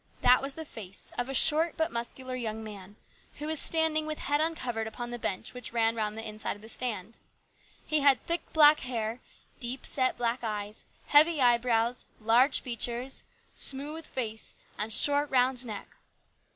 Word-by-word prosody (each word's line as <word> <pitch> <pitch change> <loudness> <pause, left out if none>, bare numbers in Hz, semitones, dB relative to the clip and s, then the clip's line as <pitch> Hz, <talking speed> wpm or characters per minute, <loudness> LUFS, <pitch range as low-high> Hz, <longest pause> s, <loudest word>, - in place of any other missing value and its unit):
That 250 0 +6
was 275 0 -3
the 320 - -7
face 200 -9 -9
of 245 +2 -2
a - - -3
short 320 +3 +4
but 320 +1 0
muscular 255 +2 -4
young 220 -3 -4
man, 205 -2 -10 0.4
who 295 - -7
was 315 -1 -1
standing 320 -1 +2
with 310 -1 -3
head 290 +1 0
uncovered 250 -9 -2
upon 240 +2 -6
the 240 - -5
bench 185 - -3
which 250 0 -7
ran 225 -1 +2
round 215 -1 -2
the 225 - -5
inside 215 0 -4
of 205 - -16
the 220 - -9
stand. 225 -3 -3 0.7
He 305 - +2
had 280 -2 +4
thick 335 0 0
black 300 -1 +7
hair, 230 -2 -2 0.4
deep 245 +2 0
set 255 -2 +2
black 240 +1 -1
eyes, 210 -1 -4 0.2
heavy 305 +2 +6
eye 240 -2 +5
brows, 235 0 0
large 235 +5 +3
features, 245 +2 -2 0.3
smooth 295 +4 -4
face, 220 -4 -4 0.2
and 215 +2 -4
short, 285 +5 +3
round 255 -1 +2
neck. 210 -2 -6
245 Hz, 175 wpm, -29 LUFS, 225-290 Hz, 0.7 s, black